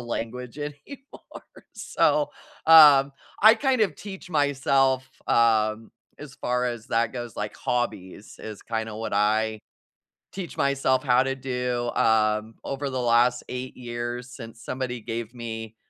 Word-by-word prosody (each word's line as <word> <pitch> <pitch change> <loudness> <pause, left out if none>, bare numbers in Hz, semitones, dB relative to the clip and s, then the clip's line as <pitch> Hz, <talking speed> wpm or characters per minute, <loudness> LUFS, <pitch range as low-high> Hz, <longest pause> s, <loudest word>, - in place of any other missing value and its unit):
language 120 +2 -5
anymore, 150 - -9 0.5
so, - - +1 0.4
um, 145 -4 +8 0.3
I, 220 +1 +9
kind 255 -2 +1
of, 205 - 0
teach 190 -2 -10
myself, 135 -3 +2 0.2
um, 110 -1 +2 0.3
as 145 -3 -10
far 125 0 -1
as 120 -2 -4
that 115 +1 0
goes, 120 -3 -7
like, 105 0 -4
hobbies 105 -5 -4
is, 110 -2 -9
kinda, 110 -1 -4
what 110 -1 -5
I 110 +1 +1 0.7
teach 185 -4 -7
myself 135 -1 +1
how 125 -1 +4
to 135 - -1
do, 125 -2 -2
um, 110 0 +2
over 140 +1 -4
the 130 - -2
last 120 +1 +3
8 125 +1 -6
years 120 +1 -5
since 115 -2 -11
somebody 125 -2 -4
gave 115 0 -5
me 115 -2 -7
125 Hz, 135 wpm, -25 LUFS, 115-135 Hz, 0.7 s, I